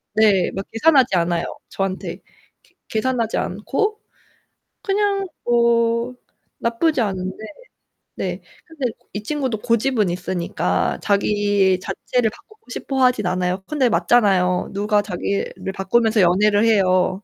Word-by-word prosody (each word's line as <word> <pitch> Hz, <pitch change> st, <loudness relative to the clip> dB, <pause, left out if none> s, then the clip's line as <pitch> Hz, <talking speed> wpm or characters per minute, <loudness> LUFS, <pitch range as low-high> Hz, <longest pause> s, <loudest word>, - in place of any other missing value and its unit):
네 205 Hz, -4 st, +4 dB
막 195 Hz, 0 st, -5 dB
계산하지 260 Hz, -3 st, +4 dB
않아요 170 Hz, 0 st, +1 dB, 0.2 s
저한테. 195 Hz, -1 st, -3 dB, 0.5 s
계 -, -, -30 dB
계산하지 230 Hz, 0 st, -1 dB
않고 420 Hz, -, -2 dB, 0.8 s
그냥 395 Hz, -1 st, 0 dB, 0.2 s
뭐 235 Hz, 0 st, +2 dB, 0.4 s
나쁘지 240 Hz, +5 st, +1 dB
않은데 190 Hz, 0 st, -3 dB, 0.7 s
네 -, -, -4 dB, 0.2 s
근데 285 Hz, -8 st, -3 dB, 0.2 s
이 205 Hz, +1 st, -5 dB
친구도 265 Hz, -5 st, -2 dB
고집은 230 Hz, -3 st, +1 dB
있으니까 180 Hz, -1 st, -1 dB
자기 200 Hz, -2 st, +2 dB
자체를 235 Hz, +4 st, -1 dB
바꾸고 435 Hz, -, -19 dB
싶어 265 Hz, +1 st, -2 dB
하진 250 Hz, -6 st, +3 dB
않아요. 185 Hz, +1 st, -1 dB
근데 270 Hz, -5 st, +1 dB
맞잖아요. 190 Hz, -6 st, +2 dB
누가 205 Hz, +1 st, +1 dB
자기를 200 Hz, 0 st, -3 dB
바꾸면서 220 Hz, +2 st, +2 dB
연애를 205 Hz, +4 st, +4 dB
해요? 185 Hz, -2 st, +2 dB
215 Hz, 270 characters per minute, -21 LUFS, 190-245 Hz, 0.8 s, 네